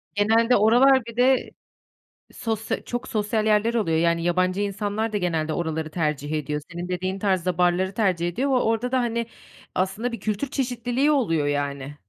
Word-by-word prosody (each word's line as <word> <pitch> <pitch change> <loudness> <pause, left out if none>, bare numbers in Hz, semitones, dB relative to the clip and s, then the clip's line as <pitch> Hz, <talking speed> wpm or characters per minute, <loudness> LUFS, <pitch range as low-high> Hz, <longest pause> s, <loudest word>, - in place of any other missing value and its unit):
Genelde 225 +4 +3
oralar 245 +4 +5
bir 230 -1 -9
de 255 +1 +3 0.8
sosya 220 -1 -3
çok 245 0 -5
sosyal 215 0 -1
yerler 215 +2 +2
oluyor. 165 -9 +1
Yani, 170 0 +2
yabancı 185 +2 +1
insanlar 205 +2 -2
da - - 0
genelde 160 -4 -1
oraları 160 -1 -3
tercih 150 -3 -2
ediyor. 150 -1 -2
Senin 175 +1 -5
dediğin 185 +1 -2
tarzda 185 -3 0
barları 180 +2 +2
tercih 180 -6 +1
ediyor 260 +11 -1
ve 265 - +3
orada 240 +1 0
da, 260 - +3
hani, 235 -1 -1 0.5
aslında, 210 +6 -1
bir 230 - -6
kültür 215 +6 -2
çeşitliliği 250 +1 0
oluyor 165 - +1
yani. 140 -1 -2
205 Hz, 165 wpm, -24 LUFS, 170-235 Hz, 0.8 s, oralar